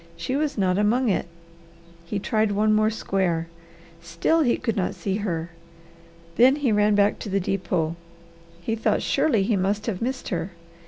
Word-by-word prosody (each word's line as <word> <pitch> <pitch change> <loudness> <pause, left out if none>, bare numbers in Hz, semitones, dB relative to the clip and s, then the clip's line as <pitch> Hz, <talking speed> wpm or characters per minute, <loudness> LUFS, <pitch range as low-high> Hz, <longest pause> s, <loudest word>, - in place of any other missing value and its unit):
She 260 - -3
was 295 -2 -1
not 185 -1 +1
among 230 +4 +2
it. 190 - 0 0.8
He 200 - -3
tried 215 +1 0
one 215 +1 +2
more 215 0 +3
square. 185 -6 -1 0.5
Still 170 - +1
he 245 -6 +2
could 225 - -2
not 190 -4 -1
see 195 -1 -2
her. 170 -5 -3 0.9
Then 260 +3 +6
he 290 -5 0
ran 210 0 +3
back 205 0 +2
to - - -6
the 195 +1 +1
depot. 180 -4 -1 0.7
He 225 - -1
thought 225 - 0
surely 225 -10 +2
he 215 +2 +1
must 200 +3 -1
have 205 -6 -3
missed 260 +3 -3
her. 175 +1 -3
205 Hz, 170 wpm, -24 LUFS, 185-225 Hz, 0.9 s, Then